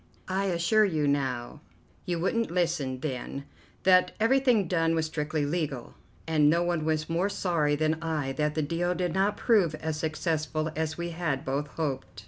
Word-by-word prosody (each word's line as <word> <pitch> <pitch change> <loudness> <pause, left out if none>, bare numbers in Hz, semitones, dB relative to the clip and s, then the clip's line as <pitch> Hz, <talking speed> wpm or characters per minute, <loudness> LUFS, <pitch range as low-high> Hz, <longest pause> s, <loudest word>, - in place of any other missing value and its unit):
I 190 +1 0
assure 185 +4 +3
you 155 -7 +1
now 130 -4 -1 0.5
you 175 -1 0
wouldn't 230 +6 0
listen 160 -7 -1
then 140 0 -4 0.4
that 185 -1 +5
everything 235 -3 +3
done 165 -1 +1
was 160 -1 +1
strictly 155 -1 -2
legal, 145 -5 -3 0.3
and 155 -2 +4
no 170 +2 +3
one 175 -3 -1
was 155 -1 0
more 170 +4 0
sorry 170 -7 +1
than 155 +2 0
I 155 -5 -2
that 150 +2 -1
the 155 - 0
deal 175 +4 -1
did 175 -1 -1
not 195 +2 +1
prove 195 -10 +3
as 155 0 -3
successful 155 0 -1
as 160 0 -2
we 170 0 -3
had 160 -5 -2
both 140 +2 -1
hoped." 140 -8 -4
160 Hz, 170 wpm, -28 LUFS, 150-175 Hz, 0.5 s, that